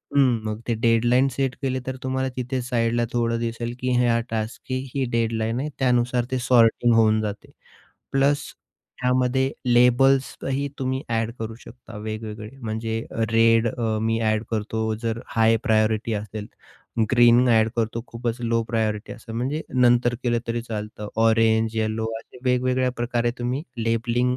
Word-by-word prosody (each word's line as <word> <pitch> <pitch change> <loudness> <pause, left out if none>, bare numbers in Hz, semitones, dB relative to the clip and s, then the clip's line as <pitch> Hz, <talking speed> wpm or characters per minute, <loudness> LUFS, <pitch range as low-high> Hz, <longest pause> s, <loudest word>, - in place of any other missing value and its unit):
हं. 130 -5 +4
मग 110 0 -3
ते 120 - +1
डेडलाईन 120 +3 +3
सेट 135 -2 -1
केले 130 -1 -1
तर 130 - -3
तुम्हाला 130 0 -1
तिथे 125 +1 -2
साईडला 120 -1 0
थोडं 115 -1 0
दिसेल 115 0 -3
की 125 0 -1
हा 115 -1 +3
टास्कची 110 +3 -4 0.2
ही 135 -2 0
डेडलाईन 115 0 0
आहे. 150 - -2
त्यानुसार 125 -1 +2
ते 130 - +1
सॉर्टिंग 120 -1 +4
होऊन 110 -1 +4
जाते 105 -1 -5 0.6
प्लस 140 +2 +1 0.5
त्यामध्ये 125 +1 +2 0.2
लेबल्सही 135 +3 +3
तुम्ही 130 +1 -2
ॲड 115 0 0
करू 115 0 -5
शकता 115 -2 -12
वेगवेगळे 110 0 -6
म्हणजे, 110 0 -3 0.3
रेड 115 0 +4
अ, 110 -2 -1
मी 115 0 +1
ॲड 110 0 +1
करतो, 110 0 -1
जर 115 0 -2 0.2
हाय 115 0 +5
प्रायोरिटी 110 -1 +2
असेल, 105 0 -5 0.7
ग्रीन 120 0 +6
ॲड 110 -1 +4
करतो, 115 0 -1
खूपच 120 0 -4
लो 115 -1 +1
प्रायोरिटी 110 -2 -1
असतं, 115 0 -10
म्हणजे 135 +6 -2
नंतर 120 -1 +4
केलं 120 -1 +1
तरी 115 0 -1
चालतं 105 -2 -6 0.2
ऑरेंज, 110 0 +3
यलो 110 0 -1
असे 125 - -17
वेगवेगळ्या 125 0 +2
प्रकारे 120 0 0
तुम्ही 125 +4 -2 0.2
लेबलिंग 120 +2 +1
115 Hz, 150 wpm, -24 LUFS, 110-125 Hz, 0.7 s, ग्रीन